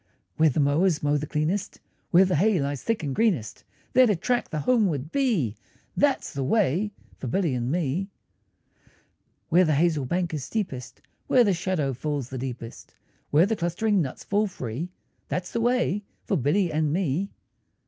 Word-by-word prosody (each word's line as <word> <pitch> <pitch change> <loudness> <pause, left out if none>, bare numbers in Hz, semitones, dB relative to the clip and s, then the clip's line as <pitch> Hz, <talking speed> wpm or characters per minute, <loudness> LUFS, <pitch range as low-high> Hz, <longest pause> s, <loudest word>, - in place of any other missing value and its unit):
Where 160 0 +5
the 145 - -1
mowers 150 +4 +2
mow 145 0 +2
the 150 +1 -2
cleanest, 160 +7 -2 0.3
Where 185 +2 +6
the 185 -4 +1
hay 200 +2 +3
lies 140 -1 -2
thick 230 -7 -1
and 140 -3 -2
greenest, 165 - 0 0.3
There 255 -1 +6
to 210 - +3
track 240 +8 -1
the 155 - -3
homeward 175 - +1
bee, 210 - +1 0.4
That's 285 -9 +1
the 140 -2 -2
way 195 +4 +2 0.3
for 130 - -5
Billy 165 +2 0
and 125 +1 -1
me. 175 +3 -1 1.4
Where 175 +3 +5
the 155 -4 +2
hazel 155 -2 +2
bank 175 +4 -1
is 150 -4 -3
steepest, 160 - -4 0.3
Where 250 - +5
the 205 -4 +3
shadow 170 -6 -1
falls 140 -1 -3
the 130 - -5
deepest, 120 -2 -7 0.3
Where 155 +5 +5
the 220 +2 0
clustering 190 +3 +1
nuts 135 -5 -5
fall 210 +1 +1
free, 140 - -5 0.4
That's 180 -1 -3
the 230 - -1
way 240 -4 +1 0.2
for - - 0
Billy 170 +5 +1
and 155 -1 +1
me. 180 +2 0
170 Hz, 170 wpm, -26 LUFS, 140-200 Hz, 1.4 s, Where